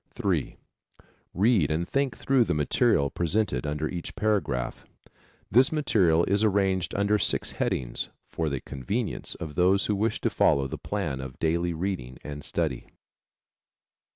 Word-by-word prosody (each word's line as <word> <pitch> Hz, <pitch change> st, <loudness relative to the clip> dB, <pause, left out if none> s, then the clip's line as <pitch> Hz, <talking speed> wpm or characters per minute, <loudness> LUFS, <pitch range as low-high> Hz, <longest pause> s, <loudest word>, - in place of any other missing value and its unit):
(3) -, -, -1 dB, 0.8 s
Read 100 Hz, -, +3 dB
and 80 Hz, +3 st, -1 dB
think 140 Hz, -3 st, 0 dB
through 135 Hz, -2 st, +3 dB
the 95 Hz, -, -1 dB
material 70 Hz, -1 st, +2 dB
presented 85 Hz, -, 0 dB
under 75 Hz, +1 st, -1 dB
each 85 Hz, 0 st, -6 dB
paragraph. 100 Hz, -13 st, -1 dB, 0.7 s
This 125 Hz, +6 st, +5 dB
material 95 Hz, -, +3 dB
is 100 Hz, +4 st, +1 dB
arranged 95 Hz, -4 st, +1 dB
under 100 Hz, +1 st, +2 dB
six -, -, +1 dB
headings -, -, -2 dB, 0.2 s
for 80 Hz, -2 st, -2 dB
the 70 Hz, -2 st, -3 dB
convenience 100 Hz, -, -4 dB
of 80 Hz, -4 st, -7 dB
those 95 Hz, +4 st, +3 dB
who 105 Hz, -, 0 dB
wish 110 Hz, +3 st, 0 dB
to -, -, 0 dB
follow 70 Hz, -1 st, +3 dB
the 65 Hz, -, -5 dB
plan 65 Hz, 0 st, -3 dB
of 65 Hz, -2 st, -8 dB
daily 85 Hz, +2 st, 0 dB
reading 80 Hz, -8 st, -3 dB
and 75 Hz, -1 st, -7 dB
study. -, -, -2 dB
90 Hz, 145 wpm, -27 LUFS, 75-105 Hz, 0.8 s, This